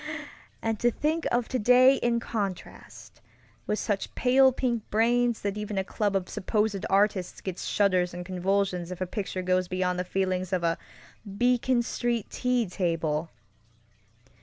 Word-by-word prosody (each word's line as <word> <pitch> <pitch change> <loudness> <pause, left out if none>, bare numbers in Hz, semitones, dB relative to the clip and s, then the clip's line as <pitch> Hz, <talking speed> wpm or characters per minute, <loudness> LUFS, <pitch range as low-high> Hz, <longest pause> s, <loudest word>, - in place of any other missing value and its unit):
And 225 -2 -1
to 240 - +3
think 310 +7 -1
of 240 -1 +1
today 255 +2 +5
in 235 -1 +1
contrast, 200 -6 -6 0.5
with 210 - 0
such 205 -3 -2
pale 265 +1 +5
pink 245 -3 -1
brains 235 +2 +2
that 200 +1 -2
even 210 -1 -4
a 190 - +1
club 205 +1 -1
of 185 -2 0
supposed 210 0 -1
artists 195 -2 +1
gets 185 -2 -5
shudders 185 -3 +2
and 175 0 -7
convulsions 185 -1 -1
if 180 - -6
a 185 - -1
picture 185 0 -4
goes 185 0 +1
beyond 180 0 -1
the - - 0
feelings 185 0 -1
of 180 -2 0
a 165 0 +1 0.6
Beacon 245 0 +2
Street 235 -2 -2
tea 250 -2 +1
table! 165 -4 -1
200 Hz, 150 wpm, -27 LUFS, 185-240 Hz, 0.6 s, today